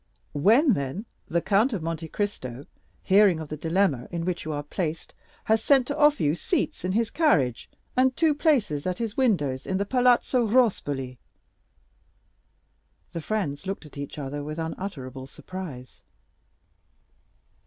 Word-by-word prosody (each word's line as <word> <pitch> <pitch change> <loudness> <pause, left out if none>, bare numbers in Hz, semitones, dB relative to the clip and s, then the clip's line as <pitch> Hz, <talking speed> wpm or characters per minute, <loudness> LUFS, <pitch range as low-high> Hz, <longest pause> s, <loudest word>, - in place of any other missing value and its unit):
"When, 225 - +5
then, 140 - -3 0.2
the 170 0 0
Count 215 +6 +3
of 185 -6 -3
Monte 165 0 -3
Cristo, 140 - -4 0.4
hearing 195 -3 +5
of 155 -2 -7
the 155 - -4
dilemma 160 -4 0
in 170 -1 -3
which 180 -3 -2
you 155 - -3
are 145 -1 -3
placed, 160 +1 -4 0.3
has 220 0 +2
sent 270 -3 +4
to 285 - -3
offer 295 0 +4
you 145 0 +3
seats 165 - -2
in 185 +1 -1
his 225 +1 +1
carriage 140 - +2 0.3
and 255 0 +3
two 320 -2 +4
places 245 - +1
at 180 -1 -1
his 225 -2 -3
windows 145 - +1
in 190 - 0
the 200 - 0
Palazzo 250 0 +3
Rospoli." 145 - +1 1.9
The 165 - -5
friends 185 -5 -3
looked 195 -3 -4
at 150 - -14
each 140 +1 -6
other 145 0 -4
with 155 +2 -6
unutterable 155 -6 -5
surprise. 145 -6 -9
180 Hz, 150 wpm, -26 LUFS, 145-225 Hz, 1.9 s, When